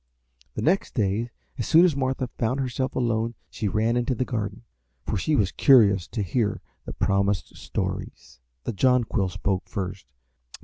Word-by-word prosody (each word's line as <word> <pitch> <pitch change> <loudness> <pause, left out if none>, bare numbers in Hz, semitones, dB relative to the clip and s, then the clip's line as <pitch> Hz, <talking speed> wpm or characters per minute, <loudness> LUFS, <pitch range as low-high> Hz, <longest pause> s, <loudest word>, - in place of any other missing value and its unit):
The - - -3
next 185 +5 +1
day 110 +1 0 0.3
as 120 - -2
soon 165 +3 +7
as 170 -6 +2
Martha 130 -1 -1
found 125 +4 0
herself 130 0 -2
alone 115 -1 0 0.2
she 105 - -2
ran 110 +4 +1
into 125 +2 0
the 130 - -1
garden, 105 -3 -4 0.4
for - - -1
she 150 +10 +1
was 100 -8 +2
curious 100 -9 +5
to 110 - -3
hear 105 +2 0 0.3
the - - -6
promised 100 -2 0
stories. - - -5 0.2
The 120 - -3
Jonquil 115 -3 +2
spoke 95 +1 -2
first. 95 -1 -5
115 Hz, 160 wpm, -25 LUFS, 100-130 Hz, 0.4 s, soon